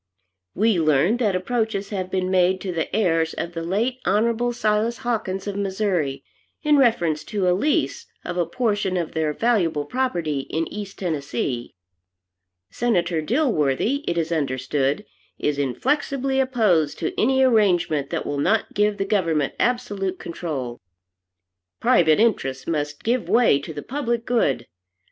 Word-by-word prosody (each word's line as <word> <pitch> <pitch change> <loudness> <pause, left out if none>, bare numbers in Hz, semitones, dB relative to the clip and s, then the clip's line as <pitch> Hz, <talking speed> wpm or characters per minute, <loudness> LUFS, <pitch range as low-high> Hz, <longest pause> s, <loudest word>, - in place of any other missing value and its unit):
We 215 -3 +3
learn 155 - +3
that 215 -6 +1
approaches 210 0 -1
have 185 -3 -3
been 185 0 -1
made 185 0 +3
to 190 - -3
the 165 -2 -2
heirs 165 -6 +1
of 170 - -4
the 165 - -4
late 220 +9 -1
Hon. 230 +4 +1
Silas 225 0 0
Hawkins 195 -5 -2
of 200 -1 -4
Missouri, 190 -8 -1 0.4
in 300 -1 +4
reference 175 - +2
to 200 -3 -1
a 180 - +4
lease 290 +12 0 0.2
of 175 - -4
a 175 -2 0
portion 205 -2 0
of 170 -3 -2
their 160 -1 0
valuable 170 -7 +1
property 170 - -1
in 165 +1 -1
East 205 -2 -7
Tennessee. 140 - -3 1.0
Senator 175 -8 0
Dilworthy, 230 - +1
it 170 - 0
is 165 0 -1
understood, 140 +3 -1 0.3
is 145 -1 -1
inflexibly 265 - 0
opposed 215 - +2
to 160 - -2
any 265 +3 +3
arrangement 185 - +2
that - - -3
will 145 -1 -2
not 215 +9 +1
give 210 0 +1
the 195 - -1
government 165 -8 +1
absolute 205 -6 -1
control. 145 -9 -5 1.0
Private 160 -1 +4
interests 135 - +1
must 150 -2 -3
give 240 +1 0
way 230 - +4
to 145 - -8
the 145 -2 -7
public 240 -4 -2
good. 145 - +1
185 Hz, 145 wpm, -23 LUFS, 160-230 Hz, 1.0 s, in